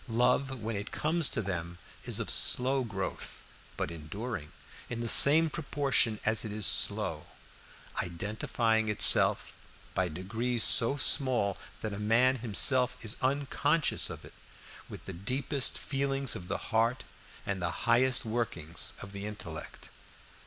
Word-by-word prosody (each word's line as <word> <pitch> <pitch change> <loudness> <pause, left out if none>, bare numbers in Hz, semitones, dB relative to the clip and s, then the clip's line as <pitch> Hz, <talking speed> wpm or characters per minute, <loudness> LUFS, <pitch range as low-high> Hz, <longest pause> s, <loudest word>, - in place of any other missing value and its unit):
Love, 125 +1 0
when 110 0 -3
it 100 +1 -5
comes 160 0 +1
to 110 - -1
them, 85 -2 -5 0.3
is - - 0
of - - -3
slow 130 +1 +1
growth, 95 -5 -6 0.3
but - - -3
enduring 85 +1 -7 0.4
in 120 - -5
the 120 - -3
same 155 +7 +9
proportion 140 -7 -1
as 110 0 +3
it 110 - -5
is 105 -1 -3
slow; - - +1 0.7
identifying 110 +5 -1
itself, 105 - +4 0.4
by 95 - 0
degrees 110 +8 -2
so 115 +8 +5
small 130 -8 +1 0.3
that 110 -2 -4
a 100 - -6
man 120 +5 +2
himself 125 +3 +1
is 110 - -2
unconscious 145 +3 0
of - - -9
it, - - -15 0.6
with - - -11
the - - -7
deepest 130 - -1
feelings 135 -1 -3
of 90 - -8
the - - -2 0.2
heart 115 +3 +1 0.4
and 100 -2 -3
the 85 -2 -4
highest 125 +2 +3
workings 110 -8 -3
of 100 - -10
the 100 +1 -6
intellect. 80 -7 -9
115 Hz, 140 wpm, -30 LUFS, 100-130 Hz, 0.7 s, same